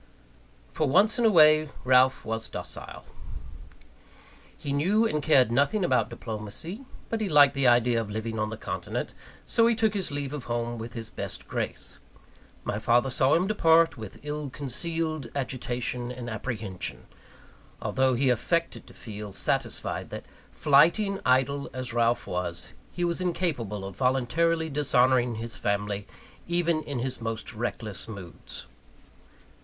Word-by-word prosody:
For 155 - +1
once 215 - +4
in 240 - +3
a - - +7
way, 155 -4 +6
Ralph 130 +1 +4
was 110 0 -2
docile. - - -6 1.5
He 140 - -4
knew 195 +10 +3
and 150 -9 0
cared 135 -6 +4
nothing 140 - +2
about 115 -9 +2
diplomacy; 115 - -5 0.3
but 225 -1 -2
he 205 - -1
liked 145 -3 +7
the 140 -2 +2
idea 120 -1 +4
of 110 - -6
living 110 +1 -4
on 110 0 0
the 110 - -6
continent, - - -4 0.3
so 230 0 +4
he 235 - +3
took 220 -1 +2
his 195 -3 -1
leave 145 -1 -3
of 145 -4 -5
home 120 0 -2
with 115 +1 -7
his 115 -2 -6
best - - -6
grace. - - -4 0.6
My 105 - -2
father 120 +4 +2
saw 130 +1 +3
him 175 +3 +2
depart, 165 -5 +4
with 110 -5 -9
ill 150 -1 -4
concealed 155 +1 -3
agitation 125 -2 -3
and 120 -1 -6
apprehension; 110 -5 -4 0.7
although 130 -1 +1
he 130 +1 +3
affected 170 +8 -1
to - - -15
feel 105 -2 -8
satisfied - - -2
that, - - -7 0.3
flighty 205 +6 +4
and 195 -1 -3
idle 135 +2 +2
as 130 -2 -4
Ralph 120 0 +2
was, 90 -1 -4 0.2
he 175 - -1
was 170 +1 0
incapable 140 - -2
of 95 -1 -8
voluntarily 155 +7 +1
dishonouring 130 -4 +2
his 115 +1 -5
family, 100 0 -2 0.4
even 170 -2 +1
in 140 -3 -4
his 125 0 -3
most 115 0 -4
reckless 110 -2 -4
moods. 100 -6 -9
130 Hz, 150 wpm, -27 LUFS, 115-160 Hz, 1.5 s, a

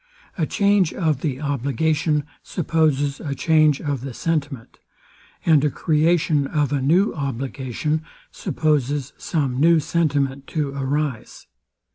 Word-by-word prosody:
A 160 -4 -1
change 200 -4 +2
of 155 -7 0
the 135 -4 -2
obligation 150 +2 0 0.2
supposes 150 -5 0
a 140 -3 -4
change 155 0 +3
of 145 -4 -3
the 130 -2 -7
sentiment; 145 -7 -3 0.7
and 155 -4 +5
a 150 - +3
creation 155 -1 +1
of 145 -3 0
a 140 - 0
new 175 +10 +3
obligation 135 +2 -3 0.3
supposes 145 -3 -1
some 135 -6 -1
new 165 +2 +5
sentiment 140 -4 0
to 150 -3 -2
arise. 140 -2 -3
145 Hz, 120 wpm, -22 LUFS, 140-160 Hz, 0.7 s, and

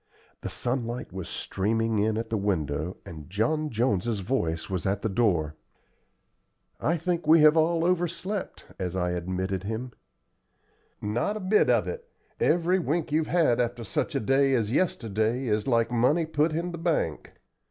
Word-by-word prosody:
The - - -4
sunlight 120 -4 -3
was 95 -2 -6
streaming 110 +2 -1
in 110 +1 +1
at 115 0 -4
the - - +1
window 85 -4 -1
and 80 -2 -10
John 150 +11 0
Jones's 110 -3 0
voice 85 -7 -1
was 95 -1 -2
at 100 +1 -1
the 110 - +1
door. 90 -8 +1 1.3
"I 170 +3 +1
think 170 0 -2
we 160 0 +7
have 155 +1 +7
all 165 +1 +2
overslept," 180 +3 -1
I - - -23
said, - - -20
as 90 0 -3
I 90 -1 0
admitted 95 +2 -3
him. 115 +4 -4 1.1
"Not 120 - -1
a - - -5
bit 200 +2 +3
of - - +3
it. 475 0 -6 0.3
Every 175 +2 +2
wink 160 -1 -1
you've 155 +1 +1
had 160 -9 +3
after 120 0 -2
such 105 - -2
a - - +2
day 135 +4 +3
as 110 -3 0
yesterday 115 - 0
is 105 -2 0
like 115 -2 +2
money 130 +8 +2
put 155 0 +1
in 170 +3 -2
the 170 - -6
bank. 160 - -1
120 Hz, 170 wpm, -27 LUFS, 100-160 Hz, 1.3 s, we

